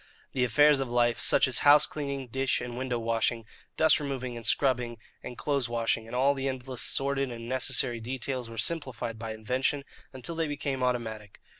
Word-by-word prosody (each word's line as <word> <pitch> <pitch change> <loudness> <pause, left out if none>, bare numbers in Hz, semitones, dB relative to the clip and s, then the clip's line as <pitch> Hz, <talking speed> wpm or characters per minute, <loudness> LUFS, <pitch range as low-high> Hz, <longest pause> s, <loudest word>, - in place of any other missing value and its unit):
The 130 - 0
affairs 145 +4 +5
of 135 -2 -2
life, 120 -1 +2
such - - +4
as 125 -3 +2
house 145 +1 +7
cleaning, 140 -3 -5
dish 135 +2 0
and 120 -1 -6
window 125 -1 -2
washing, 115 0 -1 0.3
dust 160 0 +5
removing, 130 -4 -4
and 115 -1 -3
scrubbing 125 -4 +1 0.2
and 125 - -8
clothes 140 -5 -1
washing, 115 -1 -1
and 115 - -7
all 135 +3 +3
the 135 -1 -3
endless 130 -1 -4
sordid 140 0 +1
and 115 -1 -7
necessary 130 -1 +1
details, 125 +1 -4
were 115 - -10
simplified 125 -6 -2
by 115 -1 -5
invention 130 +6 -1 0.3
until 130 +5 -6
they 165 -1 -1
became 145 -2 -3
automatic. 110 -5 -3
130 Hz, 180 wpm, -28 LUFS, 120-140 Hz, 0.3 s, house